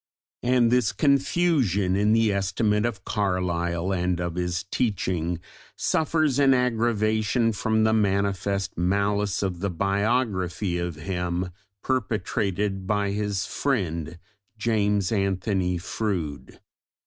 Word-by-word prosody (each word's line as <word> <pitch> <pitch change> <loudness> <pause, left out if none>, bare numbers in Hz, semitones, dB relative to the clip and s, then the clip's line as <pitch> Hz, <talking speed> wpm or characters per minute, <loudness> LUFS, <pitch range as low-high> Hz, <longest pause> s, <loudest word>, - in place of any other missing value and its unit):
And 120 -1 +3
this 125 -5 +3
confusion 140 - +2
in 105 +2 +2
the 110 -2 +3
estimate 105 +3 +1
of 100 -5 -6
Carlyle 90 -3 -1
and 90 -1 0
of 85 -1 -2
his 90 +1 -2
teaching 90 -7 -1 0.4
suffers 155 -3 +1
an 135 -2 +5
aggravation 115 -1 +1
from 110 +1 +1
the 110 0 +3
manifest 100 -2 0
malice 100 +2 +1
of 90 -3 -2
the 100 +2 -1
biography 100 -1 0
of 85 -2 -3
him 90 +2 -3 0.3
perpetrated 100 -4 -1
by 105 -1 +1
his 100 -1 -1
friend 85 - -2 0.4
James 105 -3 +1
Anthony 95 -2 0
Froude. 85 -5 -4
100 Hz, 110 wpm, -25 LUFS, 90-110 Hz, 0.4 s, an